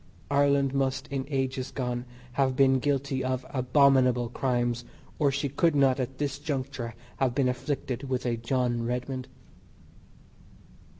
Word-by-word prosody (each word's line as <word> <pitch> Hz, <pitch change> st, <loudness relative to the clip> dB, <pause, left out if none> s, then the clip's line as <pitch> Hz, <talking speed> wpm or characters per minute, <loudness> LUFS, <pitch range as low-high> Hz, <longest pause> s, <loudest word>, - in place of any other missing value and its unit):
Ireland 140 Hz, -1 st, +3 dB
must 135 Hz, -1 st, 0 dB
in 135 Hz, -1 st, -2 dB
ages 135 Hz, -2 st, -1 dB
gone 125 Hz, -2 st, -3 dB, 0.3 s
have 130 Hz, 0 st, +1 dB
been 135 Hz, 0 st, +4 dB
guilty 135 Hz, -1 st, 0 dB
of 130 Hz, 0 st, -1 dB
abominable 130 Hz, -2 st, +4 dB
crimes 120 Hz, -1 st, 0 dB, 0.4 s
or 145 Hz, -3 st, +3 dB
she 140 Hz, +1 st, -1 dB
could 150 Hz, +3 st, +2 dB
not 135 Hz, -2 st, +4 dB
at 130 Hz, +1 st, -3 dB
this 140 Hz, -1 st, -2 dB
juncture 130 Hz, -5 st, -4 dB, 0.2 s
have 130 Hz, -3 st, +1 dB
been 135 Hz, -2 st, +3 dB
afflicted 130 Hz, 0 st, -3 dB
with 130 Hz, -1 st, -1 dB
a 120 Hz, -1 st, +1 dB
John 120 Hz, 0 st, 0 dB
Redmond. 125 Hz, +2 st, -3 dB
130 Hz, 135 wpm, -28 LUFS, 125-140 Hz, 0.4 s, been